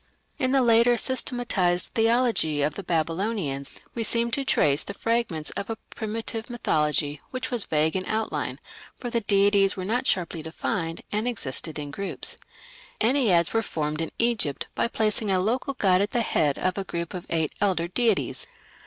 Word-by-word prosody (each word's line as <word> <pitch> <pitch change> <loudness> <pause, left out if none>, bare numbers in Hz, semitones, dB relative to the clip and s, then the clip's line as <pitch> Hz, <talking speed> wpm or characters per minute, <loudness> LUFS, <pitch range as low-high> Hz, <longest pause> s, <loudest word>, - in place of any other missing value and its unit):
In 260 -3 +1
the 270 -1 +4
later 235 +1 +5
systematized 235 -9 +1
theology 225 - +2
of 150 +1 0
the 200 - -6
Babylonians 165 -4 -1 0.2
we 230 - -2
seem 235 +1 +1
to 275 +3 0
trace 145 - +3
the 200 - -6
fragments 230 -10 0
of 200 - -5
a 225 - -3
primitive 225 +1 -4
mythology 150 -9 0
which 255 0 -4
was 240 -4 +2
vague 155 +2 +1
in 185 - 0
outline, 220 0 -2 0.4
for 245 - -5
the 235 - +1
deities 200 -1 +3
were 185 - -3
not 245 +6 0
sharply 170 -3 +1
defined, 165 +1 -3
and 215 +3 0
existed 160 - -2
in 145 -1 -5
groups. 195 +5 -3 0.6
Enneads 220 - +3
were 225 - +3
formed 155 -6 -3
in 165 - -2
Egypt 230 - 0
by - - +1
placing 215 -2 0
a 190 - +3
local 250 +8 -1
god 190 -6 +3
at 205 - +1
the 240 - +2
head 150 -10 +1
of 185 +1 -1
a - - -1
group 170 -2 -4
of 180 -2 -6
eight 160 -2 0
elder 185 -4 +2
deities. 225 +3 0
200 Hz, 170 wpm, -26 LUFS, 165-230 Hz, 0.6 s, later